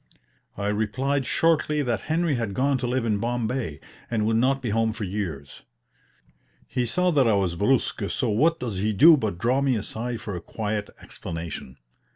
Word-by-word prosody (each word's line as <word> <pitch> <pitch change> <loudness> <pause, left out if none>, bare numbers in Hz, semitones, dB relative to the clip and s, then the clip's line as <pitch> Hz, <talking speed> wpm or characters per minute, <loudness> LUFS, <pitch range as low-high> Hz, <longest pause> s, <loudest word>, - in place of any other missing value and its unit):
I 100 0 -1
replied 125 +6 -1
shortly 150 -2 +2
that 120 -4 -1
Henry 165 0 +1
had 115 -6 -2
gone 135 +2 +1
to 125 - -2
live 125 -1 0
in 105 -3 +1
Bombay, 120 - -2 0.3
and 110 -3 0
would 110 +1 +2
not 135 +3 +2
be 120 -5 -3
home 110 0 +1
for 110 - -5
years. 90 -9 -5 1.1
He 125 -2 -1
saw 180 +9 +2
that 140 -6 +3
I 110 - +4
was 95 -3 +1
brusk, 105 0 +1
so 125 - -1
what 160 +10 +2
does 110 -7 -3
he 105 +2 0
do 160 - +8
but 110 - -2
draw 125 +8 +1
me 135 -2 +2
aside 115 +2 -4
for 105 -4 -5
a 85 - -5
quiet 105 -1 -3
explanation. 80 -6 -7
115 Hz, 185 wpm, -25 LUFS, 105-135 Hz, 1.1 s, do